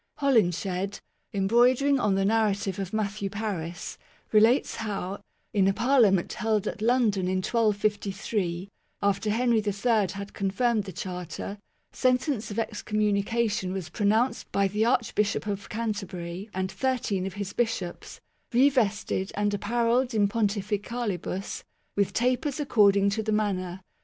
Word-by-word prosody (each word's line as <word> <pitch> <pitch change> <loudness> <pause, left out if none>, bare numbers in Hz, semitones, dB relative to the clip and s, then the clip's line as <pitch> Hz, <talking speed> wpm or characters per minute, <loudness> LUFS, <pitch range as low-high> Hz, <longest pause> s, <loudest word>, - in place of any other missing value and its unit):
Holinshed, 195 - +1 0.3
em 195 -1 0
broidering 255 +5 +4
on 210 -4 +2
the 195 0 +1
narrative 205 -3 +1
of 195 -1 -4
Matthew 205 -2 -2
Paris, 180 -6 -4 0.3
relates 225 +5 +4
how, 200 -2 -4 0.3
in 195 -2 +3
a 195 - +3
Parliament 230 -6 +3
held 220 -3 0
at - - -4
London 220 -5 +2
in 185 - 0
1253, 205 -3 0 0.4
after 200 +1 +1
Henry 235 +1 +2
III 210 0 +1
had 200 0 -7
confirmed 205 +2 0
the 190 - -6
Charter, 180 +2 -6 0.3
sentence 255 -2 +1
of 205 - -6
excommunication 210 -1 0
was 185 -4 -4
pronounced 220 +6 +1
by 200 0 +2
the 210 +3 0
Archbishop 230 -5 +1
of 200 -1 -4
Canterbury 200 -4 -4
and 190 0 -2
thirteen 200 -3 -1
of 195 - -6
his 200 -1 -4
bishops 225 -7 -3 0.2
" - - -45
revested 230 -7 +2
and 205 0 0
apparelled 235 +4 +1
in 205 -2 +4
pontificalibus, 205 -2 -2 0.3
with 200 -1 +1
tapers 255 +4 0
accord 210 -8 +4
ing 200 0 +3
to 220 - -1
the 215 0 -2
manner 190 -4 -1
205 Hz, 135 wpm, -27 LUFS, 195-230 Hz, 0.4 s, broidering